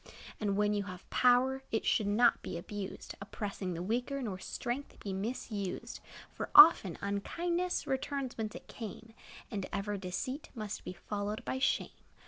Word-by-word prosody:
And 200 Hz, -2 st, 0 dB
when 210 Hz, 0 st, +3 dB
you 205 Hz, -1 st, 0 dB
have 185 Hz, -2 st, -9 dB
power, 255 Hz, +2 st, +4 dB
It 220 Hz, -, 0 dB
should 210 Hz, -, +2 dB
not 230 Hz, +4 st, +4 dB
be -, -, -5 dB
abused, 195 Hz, +3 st, -6 dB
Oppressing 195 Hz, -2 st, -4 dB
the 170 Hz, -, -3 dB
weaker, 245 Hz, +7 st, -1 dB
Nor 195 Hz, -5 st, -3 dB
strength 245 Hz, +8 st, -4 dB
be 200 Hz, -, -4 dB
misused. 200 Hz, -1 st, -3 dB, 0.3 s
For, -, -, -5 dB
often, 330 Hz, -, +9 dB
unkindness 340 Hz, -, -1 dB
Returns 265 Hz, -1 st, -2 dB
whence 215 Hz, -1 st, -3 dB
it -, -, -9 dB
came; 225 Hz, 0 st, -8 dB, 0.4 s
And 200 Hz, -4 st, -3 dB
ever 205 Hz, +1 st, -2 dB
deceit 200 Hz, -, -4 dB
must 215 Hz, -2 st, -5 dB
Be -, -, -4 dB
followed 205 Hz, +3 st, -4 dB
by 260 Hz, -, -1 dB
shame. -, -, +1 dB
210 Hz, 155 wpm, -33 LUFS, 200-250 Hz, 0.4 s, often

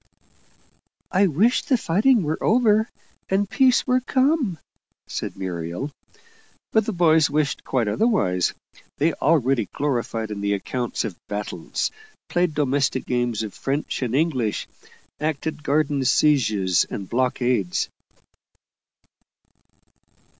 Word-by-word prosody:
"I 195 Hz, +1 st, +4 dB
wish 200 Hz, -, +2 dB
the 260 Hz, -, +1 dB
fighting 220 Hz, +5 st, +3 dB
were 155 Hz, +1 st, -2 dB
over, 220 Hz, -1 st, +3 dB, 0.4 s
and 195 Hz, +1 st, +1 dB
peace 255 Hz, +4 st, +3 dB
were 255 Hz, -1 st, +3 dB
come," 260 Hz, -, +1 dB, 0.5 s
said -, -, -5 dB
Muriel. 90 Hz, -, -4 dB, 0.8 s
But 220 Hz, -1 st, +3 dB
the -, -, 0 dB
boys 160 Hz, -4 st, +4 dB
wished 150 Hz, 0 st, -1 dB
quite 125 Hz, -5 st, 0 dB
otherwise; 105 Hz, -, +1 dB, 0.4 s
they 160 Hz, +3 st, +2 dB
already 135 Hz, -7 st, +1 dB
gloried 120 Hz, -6 st, -2 dB
in 100 Hz, -1 st, -5 dB
the 100 Hz, 0 st, +1 dB
accounts 120 Hz, +4 st, -3 dB
of 105 Hz, -5 st, -5 dB
battles, 105 Hz, 0 st, -3 dB, 0.4 s
played 175 Hz, -3 st, +1 dB
domestic 140 Hz, -2 st, 0 dB
games 120 Hz, -3 st, -1 dB
of 105 Hz, -, -6 dB
French 140 Hz, +2 st, -3 dB
and 125 Hz, -1 st, -1 dB
English, 135 Hz, -8 st, 0 dB, 0.5 s
acted 155 Hz, 0 st, -2 dB
garden 145 Hz, -1 st, +1 dB
sieges 110 Hz, -, +3 dB
and 100 Hz, -, -5 dB
blockades. 120 Hz, -6 st, 0 dB
145 Hz, 110 wpm, -23 LUFS, 115-185 Hz, 0.8 s, I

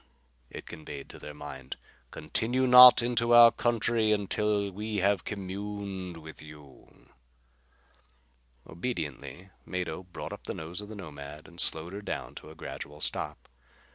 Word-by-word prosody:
it -, -, -9 dB
conveyed 75 Hz, -3 st, -9 dB
to -, -, -12 dB
their 75 Hz, -, -8 dB
mind. 70 Hz, -3 st, -8 dB, 0.3 s
"Continue 120 Hz, +11 st, 0 dB
not 125 Hz, -1 st, +10 dB
into 120 Hz, 0 st, +2 dB
our 120 Hz, -1 st, +10 dB
country 115 Hz, -1 st, +1 dB
until 105 Hz, 0 st, 0 dB
we 105 Hz, +2 st, -4 dB
have 100 Hz, -1 st, +2 dB
communed 100 Hz, -2 st, -5 dB
with 80 Hz, -1 st, -11 dB
you." 75 Hz, -3 st, -15 dB, 1.6 s
Obediently 85 Hz, -, -5 dB
Mado 90 Hz, -2 st, -4 dB
brought 90 Hz, -1 st, -8 dB
up -, -, -11 dB
the -, -, -4 dB
nose 85 Hz, +5 st, -6 dB
of 105 Hz, -, -10 dB
the 110 Hz, -, -8 dB
Nomad 75 Hz, -5 st, -9 dB
and 85 Hz, -1 st, -14 dB
slowed 80 Hz, +3 st, -1 dB
her 100 Hz, -, -6 dB
down -, -, -5 dB
to -, -, -10 dB
a 80 Hz, -, -12 dB
gradual 75 Hz, -1 st, -8 dB
stop. -, -, -2 dB
95 Hz, 140 wpm, -29 LUFS, 80-110 Hz, 1.6 s, not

